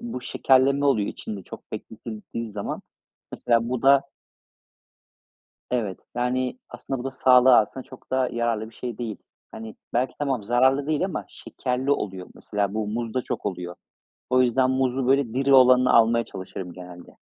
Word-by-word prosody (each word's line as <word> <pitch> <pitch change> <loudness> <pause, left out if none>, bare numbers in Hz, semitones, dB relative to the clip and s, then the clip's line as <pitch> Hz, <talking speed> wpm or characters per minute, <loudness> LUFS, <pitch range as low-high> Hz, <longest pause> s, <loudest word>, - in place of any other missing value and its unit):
bu 235 - -5
şekerleme 135 +3 +2
oluyor 110 -8 +2
içinde 100 -3 -7
çok - - -12
bekletildiği 110 +1 -7
zaman. 105 -2 -5 0.5
Mesela 115 0 +1
bu 125 -1 -2
da 135 0 +6 1.7
Evet. 110 -7 -2 0.2
Yani, 125 - -1
aslında 135 -2 -5
bu - - -6
da 135 - -3
sağlığa 130 -1 +6
aslında 130 +5 -7
çok 130 0 -15
da 130 -1 +1
yararlı 115 -2 -1
bir 115 - -21
şey 120 -3 -6
değil. 115 -4 -4 0.3
Hani, 110 -1 -9 0.2
belki 125 +2 0
tamam, 135 -7 -1
zararlı 130 +5 +2
değil 155 +4 +1
ama 185 - -4
şekerli 130 +2 -3
oluyor. 95 -8 -2
Mesela 100 -1 -2
bu 110 -1 -2
muzda 115 +3 -2
çok - - -5
oluyor. 90 -3 -4 0.6
O 130 0 +5
yüzden 130 +1 +2
muzu 130 -1 0
böyle 135 -3 +2
diri 135 +2 +2
olanını 125 -1 +6
almaya 115 0 +4
çalışırım 95 -1 -8
genelde. 90 0 -11
125 Hz, 155 wpm, -24 LUFS, 110-130 Hz, 1.7 s, da